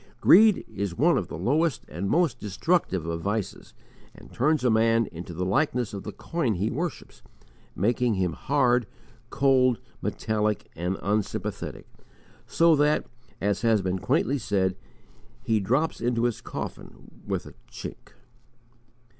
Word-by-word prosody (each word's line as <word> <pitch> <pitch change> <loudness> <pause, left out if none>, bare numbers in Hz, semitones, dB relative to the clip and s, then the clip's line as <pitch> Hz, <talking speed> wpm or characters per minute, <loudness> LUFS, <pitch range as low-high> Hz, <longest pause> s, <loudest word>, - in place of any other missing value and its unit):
Greed 215 -2 +6
is 95 -3 -4
one - - +4
of - - -1
the - - -7
lowest 145 - 0
and 90 +5 -4
most 160 -8 +2
destructive 105 - 0
of 85 0 -3
vices 105 +2 -4 0.4
and - - -15
turns 145 +2 +1
a 125 - +3
man 115 +1 +3
into 85 +1 -8
the 90 +2 -3
likeness 125 +2 0
of 100 - -5
the - - -6
coin 145 -11 -2
he 100 +5 -1
worships, 165 +4 -5 0.5
making 115 +3 +1
him 90 -3 0
hard, 120 - +1 0.4
cold, 130 -3 +3 0.2
metallic, 105 -1 -1
and 90 +3 -2
unsympathetic, 105 +2 -2 0.6
so 165 -1 +4
that, 150 +1 +2 0.3
as 100 +1 0
has 110 -4 +3
been 95 0 -1
quaintly 135 +9 +1
said, 95 -4 0 0.7
he 115 -3 +2
drops 130 +11 0
into 120 -1 0
his 120 -2 0
coffin - - -8
"with - - -2
a - - -11 0.2
chink." - - -9
115 Hz, 140 wpm, -26 LUFS, 95-135 Hz, 0.7 s, Greed